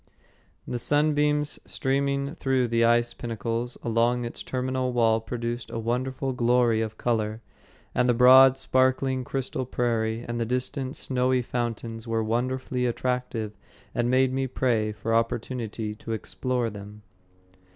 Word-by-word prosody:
The 120 - -3
sunbeams 150 +1 +2
streaming 140 +1 -1
through 130 -6 0
the 115 0 +2
ice 120 +1 +3
pinnacles 115 +1 -3
along 120 +1 +1
its 120 - -6
terminal 130 0 -2
wall 115 -2 +3
produced 120 +1 -4
a - - -5
wonderful 130 +3 -2
glory 120 -2 +3
of 110 -1 -4
color, 110 -2 -1 0.5
and 125 - +2
the 120 - +4
broad, 130 +2 +8
sparkling 130 0 +1
crystal 130 0 -3
prairie 115 -2 -1
and 120 0 -3
the 115 - 0
distant 130 +2 -2
snowy 130 -1 0
fountains 115 -1 -4
were 115 -1 0
wonderfully 125 +2 -1
attractive 120 -3 -2 0.4
and 120 0 0
made 130 0 +3
me 135 0 0
pray 115 -4 0
for 115 +2 -3
opportunity 115 -1 -1
to 115 +1 -6
explore 120 +1 -2
them. 105 +1 -10
120 Hz, 135 wpm, -26 LUFS, 115-130 Hz, 0.5 s, broad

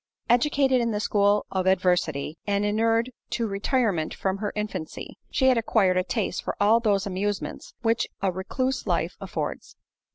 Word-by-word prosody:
Educated 265 0 +3
in 235 - 0
the 210 -2 -1
school 205 0 +2
of 190 -1 -1
adversity, 175 -5 +1
and 200 0 +1
inured 225 +3 +1 0.2
to 235 - -1
retirement 200 - 0
from 190 0 -1
her 210 -1 -2
infancy, 205 -6 -5
she 260 - +1
had 255 -2 +5
acquired 205 -5 +2
a 185 - +2
taste 205 +2 -2
for - - -3
all 215 +3 +5
those 205 -3 +1
amusements 200 +1 -3
which 230 0 +2
a 195 -1 +1
recluse 255 +9 -2
life - - 0
affords. - - -5
205 Hz, 160 wpm, -26 LUFS, 190-230 Hz, 0.2 s, had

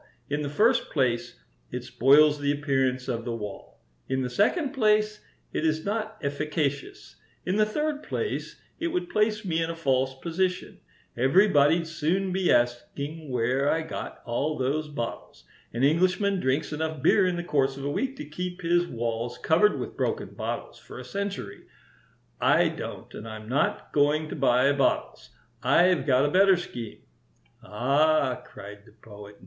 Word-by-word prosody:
In 145 +1 0
the 145 - -3
first 230 - +2
place, 120 -4 0 0.4
it - - -4
spoils 145 +3 +4
the 145 0 +1
appearance 135 -3 0
of 115 -3 -2
the 115 -1 -3
wall; 105 -3 -8 0.3
in 130 0 0
the 125 - -3
second 260 - +1
place, 215 -4 +1 0.3
it - - -1
is 155 0 0
not 215 +1 -3
efficacious; 145 0 -3 0.3
in 185 +3 0
the 215 0 +3
third 300 +5 -2
place, 440 - -4 0.2
it 335 - -1
would 350 0 -3
place 215 0 +1
me 165 -3 0
in 165 - -1
a 165 - -4
false 130 -4 0
position. 180 +4 -2 0.4
Everybody'd 150 - +4
soon 170 +4 -1
be 190 -1 +2
asking 135 +6 -1
where 130 +3 +1
I 160 0 +1
got 160 - -7
all 140 +6 -1
those 145 +4 -1
bottles. 120 - -6 0.3
An 120 +2 -2
Englishman 185 +6 +2
drinks 145 +2 0
enough 155 -2 -3
beer 190 +3 +5
in 180 - 0
the 175 - -3
course 135 -5 0
of 140 - -6
a 145 - -1
week 265 - -2
to 260 - -7
keep 180 +5 -6
his 175 +1 +2
walls 115 0 -3
covered 190 +6 +3
with - - -6
broken - - -2
bottles - - -5
for - - -12
a - - -8
century. 200 - -5 0.7
I - - +4
don't, - - -7
and 110 - -8
I'm 110 -1 -8
not 130 +4 -1
going 150 +2 +2
to - - -5
buy 130 -1 +3
bottles. 140 -2 0 0.3
I've 180 +2 +3
got 130 +1 +4
a 145 - 0
better 190 +1 +5
scheme." 120 -10 -7 0.6
"Ah!" 140 +4 +1
cried 105 +1 -12
the - - -18
Poet. 105 -2 -13
150 Hz, 165 wpm, -26 LUFS, 130-185 Hz, 0.7 s, beer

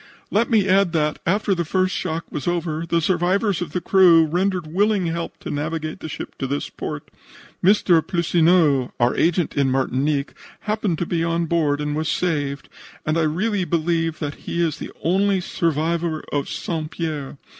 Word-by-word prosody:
"Let 225 +3 +2
me 215 -4 +3
add 190 -2 +3
that, 150 -2 0
after 200 +2 +2
the 175 -2 -1
first 185 +3 0
shock 165 +1 -3
was 145 - -4
over, 170 -2 -1
the 170 0 +1
survivors 185 +3 +1
of 170 -4 -4
the 180 - -2
crew 170 -3 +6
rendered 180 +2 0
willing 195 +4 +1
help 165 0 -3
to - - -5
navigate 155 +2 -3
the 160 - -7
ship - - -7
to 135 - -2
this 140 +2 -3
port. - - -6 0.5
Mr. 180 -3 +5
Plissoneau, 165 -6 +2
our 120 +1 +2
agent 170 0 +1
in 140 -2 +2
Martinique, 135 +2 0 0.3
happening 210 -4 -1
to 175 - -1
be 165 -1 -1
on 165 0 0
board, 155 -3 +1
was 155 0 -1
saved, 145 -5 -1 0.4
and 155 - 0
I 165 - +2
really 190 +6 0
believe 165 -1 0
that 145 -2 -4 0.2
he 170 - -2
is 165 -2 0
the - - -7
only 195 +3 +2
survivor 165 -1 -1
of 145 -1 -1
St. 160 -3 -3
Pierre. 155 -5 -4
165 Hz, 175 wpm, -22 LUFS, 155-180 Hz, 0.5 s, crew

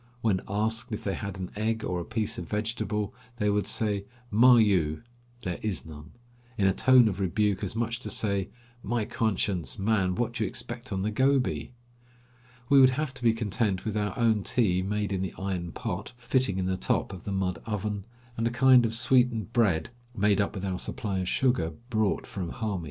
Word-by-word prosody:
When 105 -5 +1
asked 110 +3 -1
if 105 - -4
they 100 - -1
had 100 -2 -5
an 95 -1 -5
egg 110 +1 -1
or 90 -1 -2
a - - -3
piece 110 +1 -2
of - - -7
vegetable, 105 -1 -2 0.2
they 105 -3 +1
would 100 -1 0
shout 105 -3 0 0.3
"Ma 120 +4 +7
you" 95 -9 +2 0.4
("There 90 -2 -4
is 105 -4 -2
none") 75 0 -11 0.4
in 100 - +2
a 95 - +4
tone 130 +2 +6
of 100 -2 -2
rebuke, 100 +1 0
as 100 +1 -3
much 115 +1 -1
as - - -15
to - - -5
say: 100 -3 +1 0.3
"My 115 0 -1
conscience! 100 -6 -1
man, 95 -3 +1
what 120 +3 -1
do 115 -2 -1
you - - 0
expect 120 +5 -6
on 95 -1 -1
the 105 - 0
Gobi?" 130 +2 +1 0.9
We 140 +1 +6
would 130 0 +5
have 150 -4 -2
to - - -8
be 115 - +5
content 105 -3 -1
with 110 -1 -2
our 105 -2 -1
own 115 -3 +3
tea 95 -4 +1
made 105 +1 -1
in 95 - -1
the 95 -3 -4
iron 90 -3 -3
pot, 100 -2 -5
fitting 125 -4 0
in 95 - -1
the 95 0 0
top 95 - -1
of 90 - -9
the 100 - -4
mud 95 -2 -1
oven, 105 -2 -3 0.3
and 115 0 +1
a - - +1
kind 125 0 +5
of 115 - -3
sweetened 120 -2 +2
bread 105 -6 +2 0.3
made 105 0 +3
up 100 - -2
with 100 0 -4
our 95 -1 -2
supply 100 -3 -3
of 90 - -2
sugar 120 -12 +1 0.2
brought 110 -3 +1
from 90 -4 -5
Hami. 105 -5 -2
105 Hz, 205 wpm, -28 LUFS, 95-115 Hz, 0.9 s, Ma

